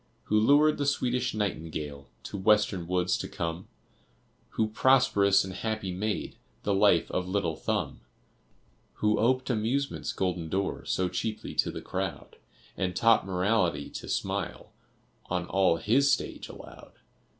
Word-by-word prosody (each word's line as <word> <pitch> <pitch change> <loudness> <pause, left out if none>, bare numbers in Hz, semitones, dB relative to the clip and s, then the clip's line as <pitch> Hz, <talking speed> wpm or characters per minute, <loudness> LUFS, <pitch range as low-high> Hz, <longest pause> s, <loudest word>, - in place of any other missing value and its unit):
Who 105 - +2
lured 145 +7 +4
the 145 - 0
Swedish 125 -3 0
Nightingale 80 -8 -4 0.2
To - - -7
Western 100 -3 +2
woods 90 0 +1
to - - -4
come? 85 +2 -4 0.9
Who 110 -1 +2
prosperous 105 -5 +4
and 95 -1 -6
happy 110 -1 -3
made 105 +4 -3 0.3
The 100 - +1
life 95 -4 +3
of 90 0 -1
little 90 -4 -1
Thumb? - - -2 0.9
Who 105 0 +1
oped 130 +3 +2
Amusement's 125 +5 -1
golden 90 -4 -2
door 95 +3 -2
So 95 - 0
cheaply 110 +4 -4
to - - +1
the - - -6
crowd, 95 -5 -4 0.4
And 90 -2 -2
taught 115 -3 +4
Morality 90 -6 0
to - - -7
smile - - -3 0.6
On 90 0 -1
all 95 -3 +2
his 135 +10 +3
stage - - -2
allowed? - - -12
100 Hz, 140 wpm, -28 LUFS, 90-110 Hz, 0.9 s, lured